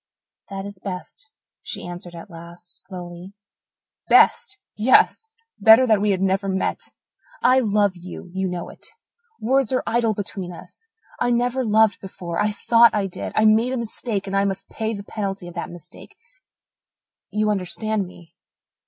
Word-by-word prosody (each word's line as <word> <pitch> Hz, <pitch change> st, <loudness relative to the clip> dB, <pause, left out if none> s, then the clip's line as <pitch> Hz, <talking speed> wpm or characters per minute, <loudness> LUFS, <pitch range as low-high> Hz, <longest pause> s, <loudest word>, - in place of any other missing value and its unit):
"That 195 Hz, 0 st, -5 dB
is 200 Hz, -2 st, -9 dB
best," 190 Hz, +10 st, -7 dB, 0.3 s
she -, -, -6 dB
answered 175 Hz, 0 st, -8 dB
at 170 Hz, +4 st, -10 dB
last, 170 Hz, +1 st, -11 dB
slowly. 180 Hz, 0 st, -9 dB, 0.8 s
"Best 465 Hz, -3 st, +5 dB, 0.2 s
yes! 255 Hz, -, +4 dB, 0.3 s
Better 220 Hz, +5 st, +8 dB
that 215 Hz, -4 st, +3 dB
we 210 Hz, -, +2 dB
had 190 Hz, -1 st, +1 dB
never 195 Hz, +1 st, +1 dB
met! 190 Hz, 0 st, -1 dB, 0.6 s
I 255 Hz, +1 st, +6 dB
love 205 Hz, -4 st, +2 dB
you 180 Hz, 0 st, -10 dB
you 190 Hz, 0 st, -1 dB
know 180 Hz, -1 st, -4 dB
it -, -, -8 dB, 0.5 s
words 265 Hz, +2 st, +2 dB
are 255 Hz, -, +1 dB
idle 230 Hz, -2 st, +1 dB
between 190 Hz, -3 st, -4 dB
us. 450 Hz, -, -12 dB, 0.3 s
I -, -, +1 dB
never 245 Hz, +2 st, +1 dB
loved 220 Hz, -1 st, +3 dB
before 175 Hz, -3 st, -5 dB
I 210 Hz, -, +2 dB
thought 230 Hz, +2 st, +4 dB
I 205 Hz, -2 st, +1 dB
did. 190 Hz, -, -5 dB
I 215 Hz, -, +4 dB
made 225 Hz, +4 st, +4 dB
a -, -, -1 dB
mistake 225 Hz, -3 st, -3 dB
and 195 Hz, 0 st, -3 dB
I 195 Hz, -, +3 dB
must 195 Hz, -1 st, -3 dB
pay 220 Hz, 0 st, -3 dB
the 200 Hz, -, -7 dB
penalty 195 Hz, -3 st, -4 dB
of 175 Hz, -, -9 dB
that 170 Hz, -, -5 dB
mistake. 175 Hz, -3 st, -11 dB, 1.1 s
You 215 Hz, 0 st, +1 dB
understand 205 Hz, +1 st, -1 dB
me?" 170 Hz, -2 st, -16 dB
200 Hz, 160 wpm, -22 LUFS, 185-225 Hz, 1.1 s, Better